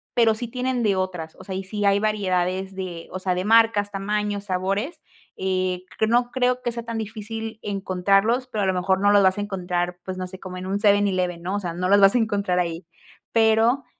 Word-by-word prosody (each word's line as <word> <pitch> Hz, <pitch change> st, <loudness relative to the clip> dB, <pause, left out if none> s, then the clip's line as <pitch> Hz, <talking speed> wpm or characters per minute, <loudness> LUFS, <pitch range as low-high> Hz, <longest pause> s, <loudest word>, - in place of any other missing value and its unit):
pero 225 Hz, -2 st, +4 dB
sí 240 Hz, +1 st, -5 dB
tienen 250 Hz, 0 st, -2 dB
de 205 Hz, -3 st, +2 dB
otras, 180 Hz, -4 st, -3 dB
o -, -, -10 dB
sea, 190 Hz, -, -6 dB
y 190 Hz, -, -3 dB
sí 205 Hz, +2 st, -3 dB
hay 200 Hz, 0 st, +4 dB
variedades 190 Hz, -3 st, -1 dB
de, 180 Hz, -3 st, -6 dB
o 185 Hz, -, -4 dB
sea 185 Hz, 0 st, -1 dB
de 180 Hz, +1 st, -2 dB
marcas, 225 Hz, -2 st, +4 dB
tamaños, 205 Hz, 0 st, -2 dB
sabores. 195 Hz, -, -2 dB, 0.3 s
Eh, 185 Hz, -1 st, -1 dB
q 220 Hz, -, +2 dB
no 240 Hz, +2 st, +2 dB
creo 250 Hz, 0 st, +1 dB
que 240 Hz, -, -2 dB
sea 235 Hz, 0 st, -5 dB
tan 230 Hz, -1 st, -4 dB
difícil 220 Hz, +1 st, -6 dB
encontrarlos, 195 Hz, +5 st, +1 dB
pero 220 Hz, -5 st, -3 dB
a -, -, +1 dB
lo 190 Hz, -, +2 dB
mejor 190 Hz, +1 st, +1 dB
no 205 Hz, 0 st, +4 dB
los 205 Hz, -1 st, +5 dB
vas 190 Hz, +2 st, +3 dB
a -, -, 0 dB
encontrar, 180 Hz, -3 st, -2 dB
pues 185 Hz, -, -5 dB
no 185 Hz, 0 st, -4 dB
sé 185 Hz, 0 st, -11 dB
como 185 Hz, -1 st, -8 dB
en 185 Hz, +1 st, -6 dB
un 195 Hz, +1 st, 0 dB
7-Eleven, 195 Hz, -4 st, +2 dB
¿no? 185 Hz, +3 st, -3 dB
O -, -, 0 dB
sea, 175 Hz, -4 st, -4 dB
no 180 Hz, +1 st, -2 dB
los 200 Hz, +1 st, +6 dB
vas 195 Hz, 0 st, +6 dB
a 250 Hz, -, +3 dB
encontrar 200 Hz, -5 st, 0 dB
ahí. 170 Hz, -1 st, -2 dB, 0.5 s
Pero, 225 Hz, +4 st, +3 dB
200 Hz, 225 wpm, -23 LUFS, 185-220 Hz, 0.5 s, los